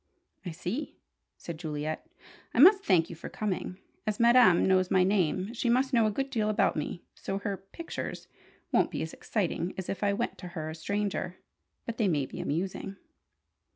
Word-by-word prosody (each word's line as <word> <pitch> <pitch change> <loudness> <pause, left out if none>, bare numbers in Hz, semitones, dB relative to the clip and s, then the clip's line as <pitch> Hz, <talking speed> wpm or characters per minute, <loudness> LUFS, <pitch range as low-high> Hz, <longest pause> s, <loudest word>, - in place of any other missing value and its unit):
"I - - -1
see," 180 - -4 0.4
said 165 -2 -7
Juliet. 155 - -4 0.5
"I - - +2
must 390 +7 +8
thank 170 -4 +3
you - - -6
for 160 - -8
coming. 190 -3 -3 0.3
As 210 -1 -1
Madame 235 -6 +6
knows 185 -1 +3
my 185 -1 +4
name, 190 +1 +1
she 235 0 -1
must 260 +3 +2
know 230 -3 +5
a - - +1
good 270 +5 -2
deal 215 -4 +1
about 210 - +2
me, 160 +2 -4
so 195 - -4
her 200 0 -2
'pictures' 195 - -7 0.4
won't - - +3
be - - -3
as 160 - -6
exciting 185 -3 -2
as 190 - -5
if 195 - -3
I 200 0 +3
went 235 +4 -2
to 180 - -7
her 155 0 -3
a - - -6
stranger. 190 +2 -2 0.5
But 230 -1 -4
they 215 - +3
may 150 -6 +1
be - - -9
amusing." 185 +5 -3
195 Hz, 190 wpm, -29 LUFS, 175-225 Hz, 0.5 s, must